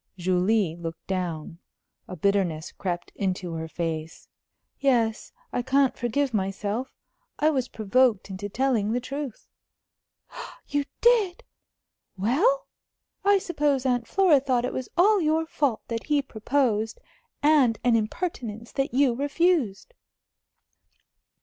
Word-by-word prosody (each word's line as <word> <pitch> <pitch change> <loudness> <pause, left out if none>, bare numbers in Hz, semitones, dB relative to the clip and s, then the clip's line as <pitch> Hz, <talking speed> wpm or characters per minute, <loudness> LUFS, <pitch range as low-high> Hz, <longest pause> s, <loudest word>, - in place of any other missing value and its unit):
Julie 185 0 +1
looked 165 -1 -7
down. 170 -3 -4 0.5
A 185 - -7
bitterness 180 -3 0
crept 175 -3 -4
into 185 -3 -2
her 160 0 -4
face. 160 -1 -4 0.5
"Yes. 235 -5 +1 0.2
I - - 0
can't 270 +1 +2
forgive 250 +2 -1
myself. 205 +5 -2 0.4
I 310 +1 +3
was 260 -4 -1
provoked 225 0 +2
into 200 +2 -5
telling 230 -3 +1
the 245 - +1
truth." 275 -1 -6 1.2
"You 290 -1 0 0.2
did! 440 -7 +3 0.7
Well? 345 - +2 0.6
I 405 0 +5
suppose 295 -7 0
Aunt 245 -2 +1
Flora 370 -7 +4
thought 255 -2 0
it - - -3
was 255 - -4
all 405 +3 +5
your 320 +1 +1
fault 285 -7 0
that 230 -1 -4
he 295 -2 +2
proposed, 225 -2 0 0.4
and 285 -7 +4
an 240 -1 +4
impertinence 230 - -3
that 270 -2 -2
you 270 -2 +4
refused?" 290 - 0
240 Hz, 120 wpm, -26 LUFS, 200-285 Hz, 1.2 s, I